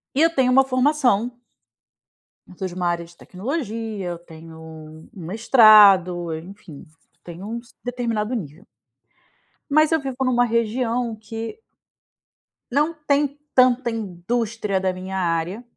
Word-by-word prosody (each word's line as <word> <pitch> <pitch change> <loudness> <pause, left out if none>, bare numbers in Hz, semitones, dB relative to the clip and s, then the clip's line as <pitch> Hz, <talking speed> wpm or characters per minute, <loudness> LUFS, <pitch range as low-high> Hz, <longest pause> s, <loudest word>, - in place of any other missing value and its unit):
E 295 - +2
eu 330 - +5
tenho 260 -4 +2
uma 270 +1 +6
formação 255 -3 +1 1.1
eu 180 - -16
sou 190 - -3
de 175 - -10
uma 180 -1 -1
área 170 0 -2
de 170 +1 -18
tecnologia, 220 - -5
eu 170 - -6
tenho 160 -1 -13
um 160 0 -12
mestrado, 195 - +5
enfim, 170 -3 -12 0.4
tenho 175 +3 -9
um 230 +2 -4 0.3
determinado 235 -2 -2
nível. 165 - -6 1.1
Mas 310 +2 +4
eu 320 - +3
vivo 270 -3 -6
numa 245 -1 +2
região 230 0 -1
que 225 - -7 1.1
não 300 +5 +1
tem 290 -1 -1 0.2
tanta 255 -1 +4
indústria 215 0 -2
da 185 -1 -1
minha 190 +1 -6
área 175 +5 -2
220 Hz, 130 wpm, -22 LUFS, 180-250 Hz, 1.1 s, uma